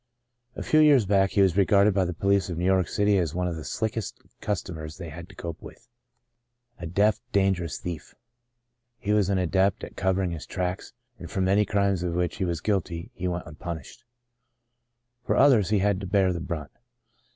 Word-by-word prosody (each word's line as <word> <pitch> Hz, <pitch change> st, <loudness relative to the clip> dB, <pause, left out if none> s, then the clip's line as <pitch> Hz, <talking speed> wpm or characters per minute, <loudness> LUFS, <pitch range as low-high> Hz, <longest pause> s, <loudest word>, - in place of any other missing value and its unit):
A -, -, -5 dB
few 155 Hz, -, +3 dB
years 145 Hz, -7 st, +6 dB
back, 95 Hz, 0 st, +3 dB
he 100 Hz, -, +3 dB
was 95 Hz, -3 st, +2 dB
regarded 100 Hz, +1 st, +4 dB
by 95 Hz, -1 st, +2 dB
the 90 Hz, -, -3 dB
police 100 Hz, +1 st, +1 dB
of 85 Hz, -, -4 dB
New 90 Hz, -, -1 dB
York 95 Hz, -2 st, +3 dB
City 105 Hz, -1 st, +2 dB
as 85 Hz, -3 st, -2 dB
one 90 Hz, 0 st, 0 dB
of 85 Hz, -, -3 dB
the 80 Hz, -, -7 dB
"slickest'* 110 Hz, +2 st, -3 dB, 0.2 s
cus 100 Hz, -6 st, -1 dB
tomers 80 Hz, -3 st, -8 dB
they 85 Hz, -3 st, -7 dB
had 85 Hz, +3 st, -10 dB
to -, -, -15 dB
cope 85 Hz, -2 st, -7 dB
with 120 Hz, -, -13 dB, 0.5 s
— 120 Hz, 0 st, -45 dB
a 85 Hz, -, -5 dB
deft, 100 Hz, +5 st, +2 dB
dan 95 Hz, -2 st, +3 dB
gerous 85 Hz, -3 st, -5 dB
thief. 85 Hz, -3 st, -7 dB, 0.8 s
He 105 Hz, -2 st, -1 dB
was 105 Hz, -3 st, +2 dB
an 100 Hz, -, +1 dB
adept 95 Hz, +2 st, +1 dB
at -, -, -8 dB
covering 95 Hz, -1 st, 0 dB
his 80 Hz, -2 st, -7 dB
tracks, 90 Hz, 0 st, -4 dB, 0.3 s
and 85 Hz, -, -8 dB
for 95 Hz, -, -2 dB
many 100 Hz, +3 st, +3 dB
crimes 100 Hz, -3 st, +1 dB
of 85 Hz, -1 st, -2 dB
which 90 Hz, -1 st, -1 dB
he 95 Hz, -, -1 dB
was 85 Hz, -3 st, -2 dB
guilty, 90 Hz, -5 st, -2 dB
he 90 Hz, -, -4 dB
went 90 Hz, 0 st, -3 dB
unpunished. 80 Hz, -1 st, -8 dB, 1.2 s
For -, -, 0 dB
others 125 Hz, -9 st, +5 dB
he 105 Hz, -, +3 dB
had 100 Hz, -1 st, +1 dB
to 95 Hz, -, -5 dB
bear 95 Hz, -1 st, +2 dB
the 85 Hz, -, -4 dB
brunt. 80 Hz, -3 st, -5 dB
95 Hz, 205 wpm, -26 LUFS, 85-100 Hz, 1.2 s, years